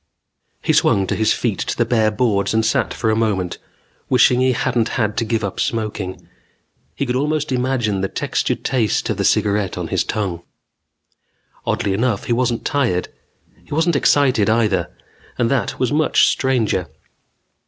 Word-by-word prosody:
He - - +2
swung 95 -1 +3
his 110 - +1
feet - - -1
to - - -3
the - - +2
bare 110 -3 +2
boards 105 -2 0
and 110 0 +2
sat 115 - +1
for 110 - -1
a - - +1
moment, 100 -6 -1 0.5
wishing 125 0 +4
he 130 0 +3
hadn't 120 -1 0
had 105 -3 0
to 115 - 0
give 110 0 -1
up 100 - -4
smoking. 105 -5 -3 0.7
He 140 - -2
could 125 -1 -2
almost 150 +2 -1
imagine 125 -6 0
the 95 - 0
textured - - -2
taste 115 -6 0
of - - -3
the - - -1
cigaret 100 -2 +1
on - - -4
his - - +1
tongue. 95 -6 -3 1.3
Oddly 100 - 0
enough, 110 0 0
he 120 - -1
wasn't 120 -1 0
tired. 120 -11 0 0.5
He - - -6
wasn't 165 +1 +2
excited, 130 -7 +3
either. 105 -6 +1 0.5
And 115 -1 +1
that 135 -3 -1
was 130 +2 0
much 155 0 +3
stranger. 115 -9 0
115 Hz, 165 wpm, -19 LUFS, 105-130 Hz, 1.3 s, wishing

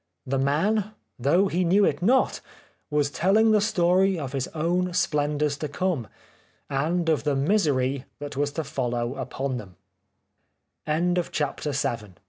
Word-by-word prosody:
The 135 +1 -1
man, 195 +10 +1 0.3
though 170 +10 +3
he 185 0 0
knew 195 +4 +4
it - - 0
not, 250 +8 +2 0.5
was 145 -1 +1
telling 210 +8 +3
the 210 -1 +4
story 190 -1 +2
of 140 -5 -4
his 135 -2 -1
own 175 +3 0
splendours 150 -1 0
to 150 - -3
come, 145 - -2 0.6
and 165 +5 0
of 160 -2 +2
the 145 -2 +1
misery 140 -5 +1
that 145 -1 -7
was 145 +1 0
to 160 - -2
follow 120 -3 -2
up 130 -2 -7
150 Hz, 125 wpm, -25 LUFS, 140-185 Hz, 0.6 s, knew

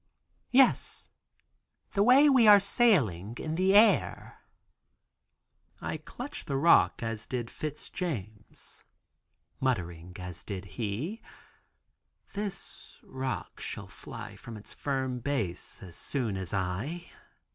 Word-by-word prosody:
"Yes, 260 0 +3 0.8
the 200 - +1
way 255 +7 +7
we 260 -6 +6
are 205 -1 +10
sailing 140 - +3
in 155 - -4
the 190 +4 +3
air." 220 +2 +4 1.4
I - - -3
clutch 255 +4 -7
the 140 - -1
rock 160 -4 +4
(as 115 -1 -3
did 120 -2 -3
Fitz 150 -1 -5
James) 110 - -5 0.8
muttering 90 -9 -2
as 90 -2 -7
did 100 -2 -6
he, 115 - -4 1.1
"This 200 -1 -6
rock 130 0 -5
shall - - -4
fly - - -9
from 115 -2 -9
its 105 - -7
firm 130 -3 -2
base, 115 -12 -3
as 85 -3 -6
soon 120 -8 -1
as 95 -3 -3
I." 100 - -3
130 Hz, 115 wpm, -29 LUFS, -, 1.4 s, are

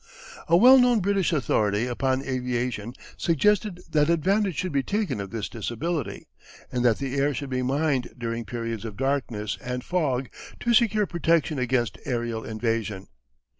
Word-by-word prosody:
A 170 0 +5
well 255 +7 +8
known 245 -2 +4
British 195 -1 +1
authority 110 -7 +1
upon 130 +2 0
aviation 125 -3 -2 0.2
suggested 185 +3 +1
that 150 0 +3
advantage 190 +3 +2
should 185 +7 -2
be 140 -1 +1
taken 200 - -2
of 100 - -6
this 110 +1 -4
disability, 125 - -4 0.5
and 125 -1 -1
that 120 -3 +4
the 135 -2 -4
air 140 0 +1
should 140 0 -5
be 130 0 0
mined 135 0 0
during 115 -1 -3
periods 115 0 -4
of 110 -3 -7
darkness 130 -6 -2
and 125 0 -4
fog 135 -7 -1 0.3
to 240 - +2
secure 215 -2 +4
protection 165 -4 +1
against 125 -2 0
aerial 120 -3 -2
invasion. 110 -3 -3
130 Hz, 155 wpm, -25 LUFS, 120-170 Hz, 0.5 s, well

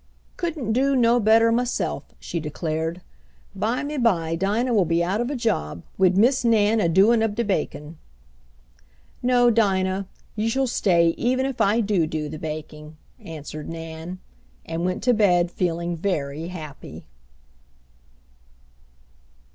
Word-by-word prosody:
"Couldn't 310 - -2
do 270 +3 +2
no 240 -1 +4
better 225 +1 +4
maself," 245 +1 -1 0.2
she 170 - -4
declared. 160 +2 -3 0.5
"Bymeby 230 - 0
Dinah 210 +8 0
will 205 -4 +4
be 165 0 +1
cut 170 - 0
out 210 +4 0
of 240 - -2
a 290 - -2
job 85 - -2
wid 185 -1 +3
Miss 250 +5 +4
Nan 225 -1 +3
a 170 - +2
doin' 205 +7 +4
ob 220 -2 0
de 235 - 0
bakin'." 160 -5 -3 1.2
"No, 245 -1 +4
Dinah, 195 -3 +1 0.3
you 220 +1 0
shall 265 +3 +1
stay 175 -8 +3
even 255 +2 +1
if 270 -2 -3
I 215 +4 +3
do 195 -7 +1
do 155 -1 -3
the 155 +1 -7
baking," 155 0 -7 0.2
answered 155 -1 -8
Nan; 165 +2 -7 0.5
and 165 +1 -4
went 185 +1 -2
to 250 +1 +4
bed 180 -5 +3
feeling 170 -1 -2
very 160 -3 -3
happy. 160 -5 -9
190 Hz, 140 wpm, -23 LUFS, 165-230 Hz, 1.2 s, no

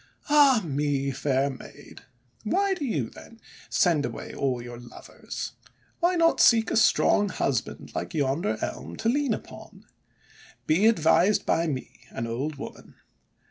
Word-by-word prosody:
"Ah 280 -6 +5
me! 140 -2 -1
fair 135 +1 0
Maid! 130 - -12 0.4
Why 390 - +1
do 360 -6 -5
you, 145 - -2
then, 230 - -14 0.3
send 165 -5 +2
away - - -6
all 130 -3 -1
your 120 0 -9
lovers? 120 0 -8 0.5
Why 355 +1 +2
not 330 -1 +3
seek 225 -2 +5
a - - 0
strong 205 -2 +3
husband, - - -3
like - - -5
yonder 150 +7 0
Elm, - - -5
to 225 - -1
lean 275 -3 +1
upon? - - -13 0.8
Be 180 +8 +3
advised 195 -1 +3
by 165 +1 +1
me, 130 -6 -5
an 115 - -5
old 130 +7 -3
woman! 140 - -10
165 Hz, 140 wpm, -26 LUFS, 135-230 Hz, 0.8 s, Ah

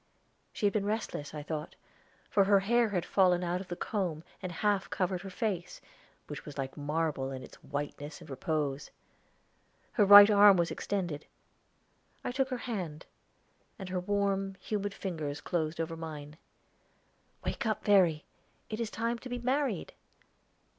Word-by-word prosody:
She 210 - -2
had 200 - +3
been 205 -2 0
restless, 210 -9 -3
I 150 -1 -6
thought, 155 +1 -5 0.5
for 200 -2 +3
her 200 0 +5
hair 235 +3 +3
had 180 -4 -1
fallen 180 -2 +3
out 180 +1 -1
of 195 - -9
the 175 - -4
comb 175 -6 -2 0.2
and 185 -2 -4
half 200 +3 0
covered 185 -1 -1
her 195 - -7
face, 190 -3 -3 0.5
which - - -7
was 145 - -10
like 135 -1 -4
marble 150 -2 -1
in 130 -1 -6
its - - -14
whiteness 145 +1 -5
and - - -13
repose. 145 +1 -2 1.0
Her 210 - +3
right 205 0 +11
arm 205 -1 +8
was 170 -1 +1
extended; 175 -7 -3 1.0
I - - -2
took 265 +1 0
her 255 - -2
hand, 180 -10 -4 0.7
and 190 -3 -7
her 180 0 -1
warm, 195 0 0
humid 205 0 -3
fingers 155 -6 -4
closed 160 -1 -2
over 165 0 -2
mine. 155 -2 -7 1.1
"Wake - - -2
up, 215 - -1
Verry; 180 -7 +4 0.5
it 215 - -3
is 230 -2 -1
time 230 +2 -2
to 255 - -9
be 245 - -2
married." 255 - -1
185 Hz, 160 wpm, -31 LUFS, 155-205 Hz, 1.1 s, right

